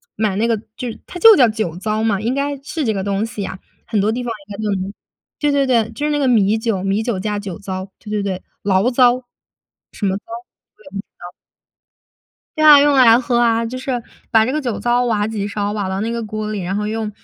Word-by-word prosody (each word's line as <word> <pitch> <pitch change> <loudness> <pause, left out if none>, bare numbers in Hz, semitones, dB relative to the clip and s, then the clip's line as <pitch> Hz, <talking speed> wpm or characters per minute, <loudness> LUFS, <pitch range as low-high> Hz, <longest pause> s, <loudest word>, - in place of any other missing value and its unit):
买 215 -3 0
那 225 +3 +1
个 230 -2 +1 0.2
就 250 - -5 0.2
它 355 - -8
就 445 +3 +9
叫 250 -3 +6
酒 215 -7 -2
糟 215 +3 -1
嘛， 205 -4 +1
应 235 +4 0
该 280 0 -1
是 305 +1 -3
这 220 - +1
个 190 -1 -3
东 200 +1 -1
西 220 -2 -6
呀， 190 -1 -5 0.3
很 215 -3 -1
多 210 +2 +1
地 245 +2 -3
方 240 - -3 0.2
应 205 - -7
该 215 - -5
都 210 - 0
能 195 +2 -5 0.5
对 295 -1 +2
对 280 -1 +2
对， 230 -4 +2
就 295 - -4
是 300 - 0
那 295 - 0
个 275 - +1
米 220 -3 +3
酒， 220 -5 -1
米 195 +2 0
酒 220 -6 -2
加 210 +1 -2
酒 195 -4 -6
糟， 190 -1 -5
对 210 - -12
对 210 -1 -1
对， 190 -2 -3 0.2
醪 195 +3 +2
糟， 250 0 +4 0.7
什 205 - -4
么 190 0 +1
糟？ - - -14 0.5
我 215 - -21
也 190 - -13
不 - - -11
知 200 - -4 0.2
糟。 175 0 -9 1.3
对 310 - +2
啊， 295 -2 +9
用 290 0 +4
来 240 -3 +7
喝 245 -1 0
啊， 230 -1 +2
就 250 +3 -5
是 255 -2 -3 0.3
把 220 -1 +5
这 255 - -1
个 305 - 0
酒 240 -6 -3
糟 240 +3 +1
挖 210 -3 +1
几 215 -2 -3
勺， 205 0 -2
挖 205 -3 -2
到 190 +1 -2
那 225 +2 -2
个 235 0 -3
锅 215 0 -4
里， 210 -2 -3
然 185 +2 -3
后 210 0 -1
用 220 0 -3
220 Hz, 270 characters per minute, -19 LUFS, 200-245 Hz, 1.3 s, 就